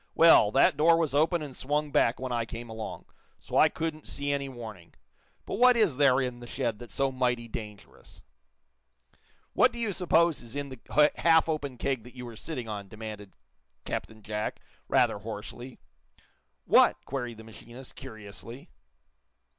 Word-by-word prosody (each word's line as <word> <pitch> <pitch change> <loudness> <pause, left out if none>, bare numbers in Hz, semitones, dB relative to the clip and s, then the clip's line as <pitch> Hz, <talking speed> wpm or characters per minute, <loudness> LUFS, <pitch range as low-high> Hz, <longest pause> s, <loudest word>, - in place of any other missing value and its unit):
"Well, 160 -10 +7
that 140 +1 +4
door 165 +2 +5
was 160 -4 0
open 160 +3 +2
and 140 -3 -8
swung 150 +2 -1
back 115 - +2
when 130 0 -4
I 120 -1 0
came 115 +1 -8
along, 110 0 -7 0.3
so - - -8
I - - +6
couldn't 160 -1 -4
see 140 0 -2
any 140 -1 -2
warning. 110 - -10 0.5
But - - -4
what 250 0 +6
is 195 - +2
there 135 -2 +5
in 125 -2 -2
the 120 - -10
shed 115 -2 -2
that's 120 - -10
so 135 -1 +1
mighty 125 -2 -1
dangerous?" 105 - -10 1.3
"What - - +5
do - - -10
you 225 -4 -1
suppose 170 -3 +2
is 120 +1 -10
in 145 -1 -4
the 150 +4 +2
half 165 -1 +4
open 145 -5 -3
keg 135 -1 -1
that 125 +3 -15
you 125 -1 -7
were 120 -1 -9
sitting 125 -1 -5
on?" 100 -2 -5
demanded 105 -1 -9 0.5
Captain 110 -1 -5
Jack, 105 0 -3 0.3
rather - - +2
hoarsely. 115 +4 -8 0.9
"What!" - - +5
queried 125 -4 -4
the 110 - -11
machinist, 120 +3 -12
curiously. 110 +4 -10
125 Hz, 165 wpm, -28 LUFS, 110-150 Hz, 1.3 s, Well